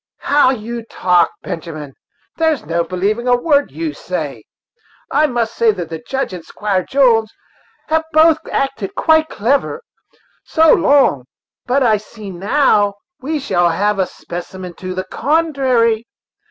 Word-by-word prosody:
"How 285 -2 +4
you 235 -1 -3
talk, 180 -6 +2
Benjamin! 155 -4 -6 0.4
there's 320 -4 +1
no 170 0 0
believing 205 +7 -2
a 245 - +5
word 285 +2 +2
you 325 -2 -4
say. - - -5 0.7
I 305 +2 +3
must 235 -4 -1
say 230 -1 +3
that 175 -4 -6
the 165 -1 -5
Judge 265 +6 -3
and 175 -2 -7
Squire 195 -1 -2
Jones 230 -5 +3 0.6
have 320 0 +1
both 315 0 +5
acted 270 -8 -2
quite 315 -1 +3
clever, 280 - -1 0.6
so 320 -1 +4
long; 280 - +3 0.4
but 265 +2 +2
I 220 -3 +4
see 210 -1 -10
that 175 - -10
now 205 -2 +2 0.2
we 305 +4 -2
shall 175 -10 +1
have 200 +4 0
a 185 - +1
specimen 175 +1 -8
to 185 0 -6
the 185 - -2
contrary. 255 - +1
230 Hz, 145 wpm, -17 LUFS, 185-285 Hz, 0.7 s, a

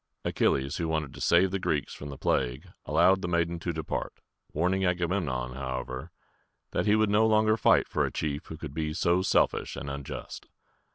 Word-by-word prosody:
Achilles, 70 +2 +1
who 85 - -1
wanted 80 -3 -2
to - - -10
save 90 +2 +4
the 95 - -1
Greeks - - -1
from 70 - -8
the 70 - -7
plague, 65 -1 -1 0.2
allowed 95 0 +4
the 90 - -2
maiden 85 0 0
to 85 - -2
depart, 80 -2 -4 0.4
warning 90 +5 +1
Agamemnon, 85 -9 -1
however, 65 -1 -5 0.6
that - - -1
he 105 - +5
would 110 -1 +2
no 110 +2 +4
longer 110 0 +4
fight - - +4
for - - 0
a - - -1
chief 75 -1 -3
who 80 - -7
could 75 -3 -7
be 75 0 -2
so 85 +1 +2
selfish 95 - +1
and 70 - -5
unjust. 70 0 -7
80 Hz, 185 wpm, -28 LUFS, 70-95 Hz, 0.6 s, he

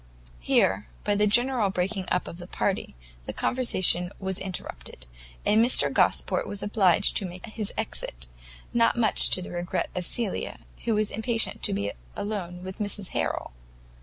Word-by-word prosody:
Here, 95 +11 +2 0.2
by 205 - +2
the 210 +1 +3
general 240 0 +4
breaking 190 +1 -2
up 180 - +1
of 170 - -8
the 175 - -9
party, 195 - -2 0.3
the - - -4
conversation 185 -8 +2
was 190 -1 -3
interrupted, 65 - -6 0.4
and 215 +2 +5
Mr 245 - +5
Gosport - - +2
was 205 - -2
obliged 200 -4 +3
to 195 - -2
make 180 +1 -9
his 215 -2 -3
exit; - - -2 0.5
not 235 0 +3
much 230 -2 +4
to 185 - +1
the - - -8
regret 175 0 -2
of 180 - -3
Cecilia, 230 -5 -2 0.2
who 230 -2 +2
was 215 0 0
impatient 225 +1 0
to - - +1
be 100 +1 -1 0.2
alone 180 -4 -4
with 190 +2 -7
Mrs 205 -2 -2
Harrel. - - -2
195 Hz, 165 wpm, -26 LUFS, 180-215 Hz, 0.5 s, and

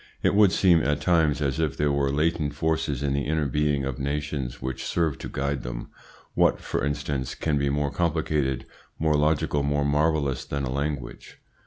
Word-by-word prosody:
It - - +3
would 100 -2 +6
seem, 90 -5 +4
at 75 +1 0
times, 80 -5 +2
as 70 +1 -1
if 75 -4 0
there 75 -1 +2
were 70 -1 +1
latent 75 0 0
forces 75 -3 -1
in 70 -1 0
the 70 0 -1
inner 80 0 +1
being 70 0 0
of 65 -2 -4
nations 70 -2 -3
which 65 -1 -4
serve 80 -5 0
to - - -6
guide 70 0 -2
them. - - -6 0.4
What, - - +3
for - - -3
instance, 70 -2 -2
can 75 -3 0
be 70 0 +1
more 70 0 0
complicated, 75 -6 0 0.3
more 80 -1 +2
logical, 75 -1 +1
more 70 0 0
marvellous 75 -2 +1
than 70 -1 -3
a 65 - -2
language? 70 -2 -4
70 Hz, 185 wpm, -26 LUFS, 70-75 Hz, 0.4 s, would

